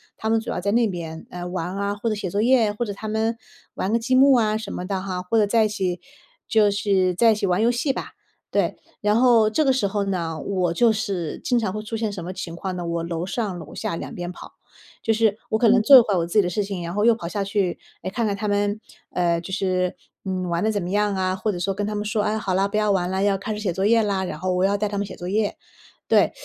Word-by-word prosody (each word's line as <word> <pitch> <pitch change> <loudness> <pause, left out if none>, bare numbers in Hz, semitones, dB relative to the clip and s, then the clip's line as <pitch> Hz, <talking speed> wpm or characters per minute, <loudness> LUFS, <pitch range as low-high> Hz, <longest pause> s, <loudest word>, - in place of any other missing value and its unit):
他 220 - -3
们 225 0 +3
主 225 - -7
要 - - -3
在 200 +2 0
那 230 0 +3
边， 165 -4 -6
呃， 180 0 -7
玩 180 +1 -4
啊、 200 0 -1
或 220 +3 -4
者 215 - 0
写 195 -3 -4
作 205 +4 0
业、 235 -3 +4
或 235 +3 -3
者 205 - -4
他 215 +2 -6
们 220 +1 0 0.4
玩 190 - -2
个 230 - +2
积 255 +3 +1
木 270 +1 +7
啊 215 -2 +2
什 220 -2 -6
么 180 - -4
的 195 -2 -2
哈， 185 -2 -4
或 205 +5 0
者 210 - +5
在 220 +1 +3
一 - - +2
起 185 -4 -2 0.5
就 210 -2 +4
是 195 -3 +1
在 225 +4 +4
一 - - -2
起 210 -1 -1
玩 180 +3 +1
游 235 - +4
戏 245 +4 0
吧， - - -6 0.4
对。 - - 0 0.2
然 210 +2 +3
后 235 -4 +5
这 305 +7 +1
个 265 - +4
时 245 -6 +1
候 200 +1 -1
呢， 165 -5 -2
我 185 -4 -1
就 230 +4 +4
是 195 -7 -3
经 245 - +2
常 200 -4 -2
会 215 - -3
出 225 +1 -4
现 220 -2 -1
什 175 - -6
么 180 - -5
情 175 -2 -6
况 185 +1 -4
呢， 175 - -4
我 170 0 -2
楼 170 0 -3
上 200 -3 -3
楼 - - -10
下 165 - -3
两 - - -6
边 175 0 -4
跑。 - - -12 0.5
就 225 - +2
是 220 -1 +2
我 220 - +2
可 230 - +5
能 230 -1 +5
做 270 +5 +9
一 - - +11
会 210 -3 -1
儿 - - +2
我 165 - 0
自 175 - -8
己 210 - +6
的 - - -1
事 205 +4 -1
情， 195 -3 -5
然 170 +1 -5
后 205 - 0
又 235 -1 +6
跑 170 -6 -6
下 200 +2 -2
去， 195 -3 -1 0.2
诶， 185 - -2
看 230 +2 -1
看 200 - 0
他 210 - -3
们， 205 +1 0 0.3
呃， 170 -2 +1
就 180 +3 -8
是， 185 -2 0 0.3
嗯， 185 -1 -2
玩 170 +2 0
得 220 - +2
怎 205 -2 -1
么 175 - -4
样 205 0 +1
啊， 185 0 0
或 210 +3 -1
者 180 - -5
说 195 +2 -1
跟 205 +1 -2
他 210 - -3
们 210 0 -3
说： 210 0 0
“哎， 215 +1 0
好 195 -3 -2
啦， 195 +2 +2
不 210 +1 -2
要 210 -1 +2
玩 180 -2 +1
啦， 190 +1 -1
要 200 -1 +3
开 215 +3 -4
始 - - -5
写 195 -5 -1
作 190 +3 -2
业 225 +1 +4
啦。” 200 -2 0
然 155 - -5
后 185 +1 -1
我 180 +1 +1
要 200 +1 +2
带 210 +1 0
他 205 - -4
们 200 - -1
写 - - -9
作 175 - -7
业， 205 +2 0 0.5
对。 - - +4
200 Hz, 315 characters per minute, -23 LUFS, 185-220 Hz, 0.5 s, 一